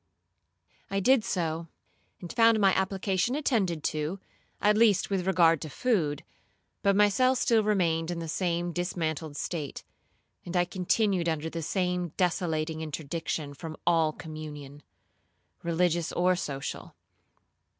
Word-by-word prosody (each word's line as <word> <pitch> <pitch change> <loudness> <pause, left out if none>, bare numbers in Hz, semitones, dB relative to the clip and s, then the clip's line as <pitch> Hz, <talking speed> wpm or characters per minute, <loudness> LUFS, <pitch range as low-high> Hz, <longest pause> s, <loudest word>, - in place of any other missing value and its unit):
I 195 - 0
did 250 +3 +4
so, 165 -4 -2 0.5
and 175 - -7
found 230 -1 +5
my 195 -2 +5
application 190 +4 0
attended 200 - 0
to, 155 +5 -3 0.4
at 210 0 +3
least 210 -3 +3
with 190 -2 0
regard 165 -4 +4
to 155 - -5
food, 160 - 0 0.6
but 200 -1 +3
my 210 +1 +6
cell 255 +6 +3
still 230 -3 +3
remained 170 -6 +1
in 175 - -3
the 165 -1 -4
same 175 +1 -1
dismantled 160 -4 -3
state, 150 -4 -4 0.6
and 175 +1 -3
I 175 - +3
continued 185 0 +1
under 160 0 -2
the 165 - -4
same 180 0 -1
desolating 160 -3 0
interdiction 155 -1 -4
from 155 +2 -8
all 165 -2 +3
communion, 150 -3 -9 0.8
religious 170 -1 0
or 180 +1 +2
social. 140 -5 -5
175 Hz, 130 wpm, -28 LUFS, 160-195 Hz, 0.8 s, my